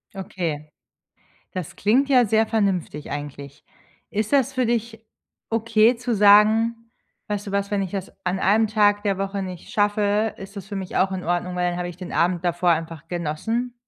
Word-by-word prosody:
Okay. 165 -6 -4 0.8
Das 185 -4 -6
klingt 255 +8 +2
ja 250 -3 +5
sehr 220 +1 +2
vernünftig 190 -9 -1
eigentlich. 145 0 -7 0.5
Ist 215 +4 -2
das 275 -1 +3
für 255 -1 +1
dich 230 -1 -2 0.4
okay, 225 +1 +3
zu 240 0 -2
sagen: 220 +3 +4 0.4
„Weißt 205 0 -3
du - - -5
was, 200 0 -1
wenn 205 -1 +1
ich 190 -2 -4
das 195 -2 -5
an 185 +1 -1
1 215 +4 +3
Tag 205 -1 +2
der 200 -2 0
Woche 195 0 -3
nicht 185 -2 -8
schaffe, 210 +1 +1
ist 195 +2 -10
das 200 -1 -8
für 205 - -6
mich 190 -1 -5
auch 190 +1 +2
in 185 -1 -4
Ordnung, 175 +1 -1
weil 180 0 +1
dann 175 - -4
habe 175 0 -3
ich 175 - -10
den 180 -1 -8
Abend 175 0 +1
davor 175 +1 +1
einfach 165 -1 -3
genossen.“? 185 +9 -2
200 Hz, 185 wpm, -23 LUFS, 180-220 Hz, 0.8 s, ja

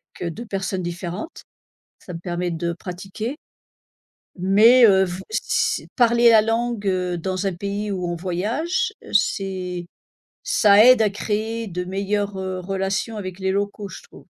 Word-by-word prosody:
Avec, 175 - -4
heu, - - -3
2 235 +8 -8
personnes 190 -3 -3
différentes, 175 - -6 0.6
ça 180 - -10
me 165 - -6
permet 175 0 -3
de 170 +1 -2
pratiquer. 195 - -6 1.0
Mais, 220 +7 +6
heu, 190 -3 +5
v 180 +1 -6
s 435 - 0
parler 235 -1 +5
la 220 -2 +7
langue, 225 -1 -1
heu, 180 -2 0
dans 185 +3 -2
un 190 - -1
pays 200 +3 -4
où 180 -2 -2
on 175 - -2
voyage, 230 - -1 0.2
c'est 185 -4 -1 0.6
ça 205 -2 +5
aide 250 -2 +7
à 215 - +3
créer 220 +3 -3
de 180 -1 -4
meilleures, 200 +1 -2
heu, 185 -1 -4
relations 195 +4 -2
avec 185 -2 -6
les 190 0 0
locaux 200 0 -3
je - - -10
trouve. - - -16
195 Hz, 160 wpm, -22 LUFS, 180-215 Hz, 1.0 s, la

